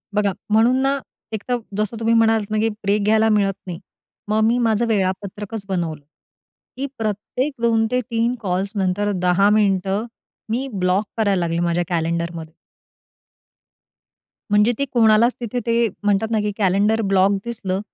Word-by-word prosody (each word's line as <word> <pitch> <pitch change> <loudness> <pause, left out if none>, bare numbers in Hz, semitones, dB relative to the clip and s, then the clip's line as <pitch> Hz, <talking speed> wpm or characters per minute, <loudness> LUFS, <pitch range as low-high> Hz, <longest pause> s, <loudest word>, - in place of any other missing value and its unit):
बघा, 205 -1 +2 0.2
म्हणून 225 +4 +4
ना, 275 +1 +1 0.3
एक 215 -2 -4
तर 245 - +2 0.2
जसं 215 +2 -2
तुम्ही 230 0 +1
म्हणालात 220 -2 +2
ना, 215 - 0
की 225 +1 +2
ब्रेक 200 +1 +1
घ्यायला 220 +1 +3
मिळत 200 -2 +2
नाही, 175 -1 -5 0.5
मग 215 +1 +1
मी 235 +2 +3
माझं 220 +2 +1
वेळापत्रकच 200 +1 -2
बनवलं, 165 -5 -2 0.7
की 275 - -2
प्रत्येक 225 +6 -2
2-3 230 +1 +1
कॉल्स 190 +1 -1
नंतर 200 +2 0
10 180 +3 +3
मिनिटं 200 0 +1 0.4
मी 255 +4 -1
ब्लॉक 185 +2 +1
करायला 200 -4 +2
लागले 170 0 -1
माझ्या 175 0 +1
कॅलेंडरमध्ये. 170 -1 -2 2.0
म्हणजे 210 +3 +4
ते 280 - +1
कोणालाच 230 +1 +4
तिथे 240 +1 -2
ते 230 0 +2 0.2
म्हणतात 205 +2 +1
ना, 220 - +2
की 210 0 -1
कॅलेंडर 205 +3 +2
ब्लॉक 195 -1 +3
दिसलं, 195 -5 -3
210 Hz, 145 wpm, -21 LUFS, 190-225 Hz, 2.0 s, म्हणून